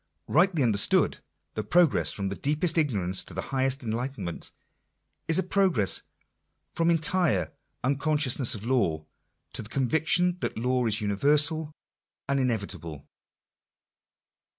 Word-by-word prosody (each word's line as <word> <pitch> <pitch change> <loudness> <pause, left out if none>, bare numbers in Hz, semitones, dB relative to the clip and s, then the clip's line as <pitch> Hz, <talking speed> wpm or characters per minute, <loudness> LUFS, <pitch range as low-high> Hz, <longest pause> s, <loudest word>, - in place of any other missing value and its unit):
Rightly 170 -2 +2
understood, 105 -4 +2 0.3
the 110 - -4
progress 175 +1 +2
from 100 -1 -3
deepest 150 - -1
ignorance 95 - -1
to - - -8
highest 135 0 -1
enlightenment, 115 -5 -4 0.8
is 165 - +5
a 190 - +2
progress 185 - +1 0.7
from 165 0 +1
entire 165 - +2 0.3
unconscious 145 0 0
ness 125 -4 +3
of 105 +1 -8
law, 100 -12 0 0.5
to - - -5
the 105 - -11
conviction 160 +8 +2
that - - -4
law 125 +1 0
is 110 -1 0
universal 150 +9 +2 0.6
and 140 0 0
inevit 115 -6 -1
able. 75 -4 -10
130 Hz, 120 wpm, -26 LUFS, 105-155 Hz, 0.8 s, is